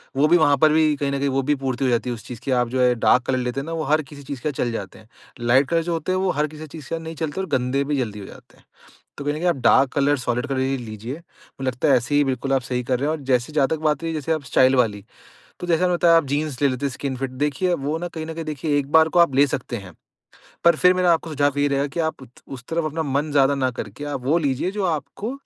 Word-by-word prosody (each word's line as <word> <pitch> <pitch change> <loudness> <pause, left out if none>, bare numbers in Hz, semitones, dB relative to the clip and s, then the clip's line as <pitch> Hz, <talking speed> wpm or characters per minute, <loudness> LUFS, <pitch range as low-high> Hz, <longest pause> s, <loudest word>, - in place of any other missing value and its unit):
वो 140 +3 +3
भी, 175 +3 +5
वहाँ 145 -4 +4
पर 155 +2 +4
भी 155 -1 +3
कहीं 140 0 -2
न 140 - -1
कहीं 140 - 0
वो 135 0 +1
भी 145 +2 +1
पूर्ति 130 0 -1
हो - - +2
जाती 120 +1 0
है - - -1
उस 115 - -10
चीज़ 120 -3 -8
की, 135 - -2
आप 125 -1 +2
जो 130 0 -1
है, 125 -1 +4
डार्क 125 - +5
कलर 130 - +1
लेते 125 +1 -2
हैं 135 - -5
ना, 165 - -5
वो 160 -1 -2
हर 155 - +3
किसी 145 -1 -12
चीज़ 135 -2 -7
के 155 - 0
साथ - - -5
चल 120 - -1
जाते 100 -3 -6
हैं। 110 +1 -20 0.3
लाइट 125 +3 +3
कलर 165 -1 +1
जो 170 0 -2
होते 165 +3 -2
हैं, 185 - +1
वो 190 -1 +1
हर 150 +1 0
किसी 155 +1 -10
चीज़ 150 -2 -11
के 165 - -1
साथ 165 - -6
नहीं 160 0 -7
चलते 155 +5 -3
और 190 - -4
गंदे 130 +3 -1
भी 145 0 -1
जल्दी 105 -5 -3
हो 100 - -8
जाते - - -15
हैं। - - -25 0.5
तो 140 - -6
कहीं 145 0 0
न - - -4
कहीं 175 +2 0
आप 170 - +2
डार्क 135 - +5
कलर, 145 +1 +2
सॉलिड 125 +1 -2
कलर 135 -2 -2
ही 135 +1 0
लीजिए। 115 +1 -7
मुझे 165 -4 -14
लगता 130 +4 0
है, 135 - +6
ऐसे 120 +4 -1
ही 145 - +5
बिल्कुल 135 +1 -2
आप 135 - +3
सही 125 0 -2
कर 125 -1 0
रहे 145 +3 -1
हैं 160 - 0
और 145 - -12
जैसे 125 +2 0
जहाँ 145 -3 +2
तक 160 - -1
बात 150 -1 0
हुई, 165 0 -2
जैसे 155 +1 -2
आप 155 -3 -2
स्टाइल 130 +1 +4
वाली, 105 -5 +1 0.6
तो 175 - -6
जैसा 170 0 +2
मैंने 180 -1 +2
बताया, 170 -1 +5
आप 165 - +1
जीन्स 145 0 -2
ले 140 - +5
लेते 130 +1 -2
हैं 140 - -1
स्किन 135 0 -4
फिट। 135 0 -3 0.2
देखिए, 175 +6 -1
अब 140 -6 -2
वो 155 +2 -1
ना, 175 +1 -4
कहीं 160 -2 -6
न 160 - -6
कहीं 165 0 -6
देखिए, 150 0 -1
एक 140 0 -6
बार 160 0 +6
को 175 - +2
आप 165 -6 +4
ले 140 +1 +5
सकते 120 -2 -4
हैं। 95 -4 -11 0.7
पर 170 -1 +6
फिर 180 +3 +5
मेरा 180 -1 +3
आपको 165 0 -2
सुझाव 145 -2 0
ये 145 - +3
रहेगा 140 0 0
कि 155 +5 -6
आप 160 -4 -2
उत 130 - -12 0.3
उस 125 - -12
तरफ 165 0 0
अपना 160 +1 -2
मन 145 +1 -1
ज़्यादा 140 0 +3
ना 130 -2 0
करके 110 +3 -7
आप 145 -3 -4
वो 150 +6 +2
लीजिए 145 +3 -1
जो 205 -1 -3
आपको 160 - -3
145 Hz, 315 wpm, -22 LUFS, 130-160 Hz, 0.7 s, है